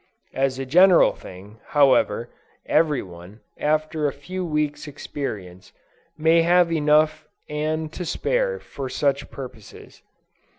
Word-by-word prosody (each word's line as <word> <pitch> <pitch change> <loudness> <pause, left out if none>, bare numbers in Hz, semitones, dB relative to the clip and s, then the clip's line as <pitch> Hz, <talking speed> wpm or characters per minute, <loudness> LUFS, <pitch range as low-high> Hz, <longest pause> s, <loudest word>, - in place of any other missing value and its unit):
As 135 -1 0
a 135 - -4
general 180 +6 +5
thing, 100 +4 -13 0.2
however, 125 -5 +3 0.3
every 150 -4 +2
one, 90 +4 -13 0.2
after 155 0 0
a - - -1
few 180 +7 -6
weeks' 150 -3 -2
experience, 100 -11 -7 0.4
may 160 +2 +4
have 175 0 +3
enough 155 0 +2 0.2
and 155 +1 -3
to 180 - -5
spare, - - -1
for 135 -2 -7
such 140 +1 -1
purposes. 125 -6 -11
150 Hz, 120 wpm, -23 LUFS, 130-160 Hz, 0.4 s, general